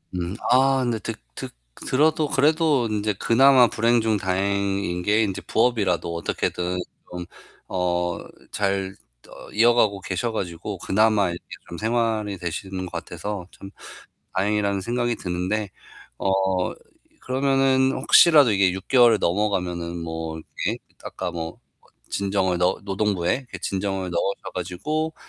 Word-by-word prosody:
음 90 +3 -3
아 135 +1 +4
근데 120 -3 -1
드 - - -4 0.2
드 - - -6 0.4
들어도 155 +3 +2
그래도 150 -3 +2
인제 105 0 0
그나마 130 +1 +6
불행 115 +1 +2
중 110 -1 +1
다행인 95 -1 -1
게 105 +3 +3
인제 95 -3 -3
부업이라도 100 -8 +1
어떻게든 90 +2 -2 0.3
좀 90 0 -5 0.4
어 90 -1 -1 0.3
잘 95 -1 -1 0.3
어 - - -12
이어가고 110 -3 +3
계셔 95 +5 -2
가지고 95 -1 -4
그나마 105 0 +2
이렇게 85 - -7 0.2
좀 85 - -7
생활이 110 -3 0
되시는 95 +2 -4
것 90 - -9
같아서 100 -4 -5
참 95 0 -12 0.6
다행이라는 100 0 +1
생각이 120 +2 -1
드는데 95 +3 -2 0.5
어 - - -1 0.9
그러면은 135 0 +2
혹시라도 150 -8 +6
이게 95 -3 +3
6 95 +1 -7
개월을 120 -4 +6
넘어가면은 90 -3 -1
뭐 80 -1 -5
이렇게 - - -4 0.2
아까 90 - -4
뭐 80 -1 -6 0.5
진정을 95 -2 0
넣 90 +1 +1
노동부에 95 -3 0
이렇게 125 -8 -9
진정을 95 -1 -2
넣으셔 85 +3 -2
가지고 135 - -3
100 Hz, 290 characters per minute, -23 LUFS, 90-115 Hz, 0.9 s, 그나마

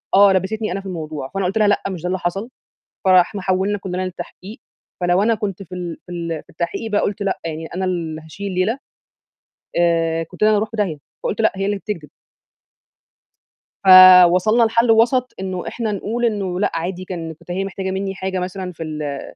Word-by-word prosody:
آه، 200 -1 +7
لبّستني 210 +2 -1
أنا 195 - -2
في - - -19
الموضوع، 155 -6 -5
فأنا 195 -1 -1
قُلت 195 +4 -1
لها: 215 - +4
"لأ، 205 - +2
مش 180 -4 -6
ده 180 - -3
اللي 185 0 -1
حصل." 195 +7 -3 0.6
فإحنا 185 +2 +4
حولنا 190 +2 0
كلنا 185 -1 -5
للتحقيق، 190 +4 -8 0.4
فلو 180 +3 +3
أنا 230 +1 +3
كنت 200 -2 -4
في 180 +1 -10
ال 175 -2 -5
في 180 - -12
ال 170 -2 -4
في - - -38
التحقيق 170 +7 -4
بقى 205 - +2
قُلت 205 +1 -2
لأ، 195 -1 -1
يعني 160 0 -4
أنا 190 - -1
اللي 165 -4 -3
هاشيل 175 +6 -7
الليلة، 195 +7 0 1.0
آآ، 165 -1 +2
كنت 165 - -5
أنا 215 - +6
اللي 215 - +4
هاروح 215 +1 -1
في 225 - -8
داهية 185 -7 0 0.3
فقُلت: 225 - -1
"لأ، 220 - +4
هي 195 0 -2
اللي 205 0 0
بتكدب." 180 -7 -6 1.8
فوصلنا 185 +3 +8
لحل 230 +1 +2
وسط 240 +3 +3
إنه 185 -2 -4
إحنا 225 -3 -3
نقول 220 +4 -2
إنه 195 -5 -1
لأ، - - +2
عادي، 175 +2 -3
كان 170 -3 -5
كنت 170 - -17
هي 190 +2 -1
محتاجة 190 0 -4
مني 195 0 -3
حاجة 190 -1 -3
مثلًا 180 0 -4
في 165 - -9
ال 150 -3 -4
185 Hz, 200 wpm, -20 LUFS, 175-205 Hz, 1.8 s, فوصلنا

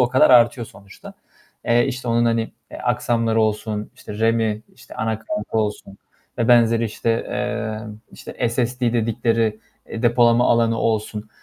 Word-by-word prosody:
o 125 - +3
kadar 130 +1 +4
artıyor 120 -1 +4
sonuçta. 100 0 -14 0.5
Eee, 120 0 +3
işte 130 -2 -4
onun, 115 0 +2
hani 115 -1 0 0.2
e, - - -8
aksamları 115 -1 0
olsun, 105 -1 -2
işte 105 0 -10
RAM'i, 110 -1 +1
işte - - -15
ana 110 -1 -2
kartı 160 - -4
olsun 105 -2 -4 0.4
vb. 115 -1 +4
işte, 115 +1 -1
eee, 110 -2 -3 0.3
işte - - -4
SSD 120 0 -1
dedikleri 115 -1 0 0.3
e, 115 - -7
depolama 120 0 +4
alanı 115 -1 +2
olsun; 110 -1 -2
115 Hz, 140 wpm, -21 LUFS, 110-120 Hz, 0.5 s, kadar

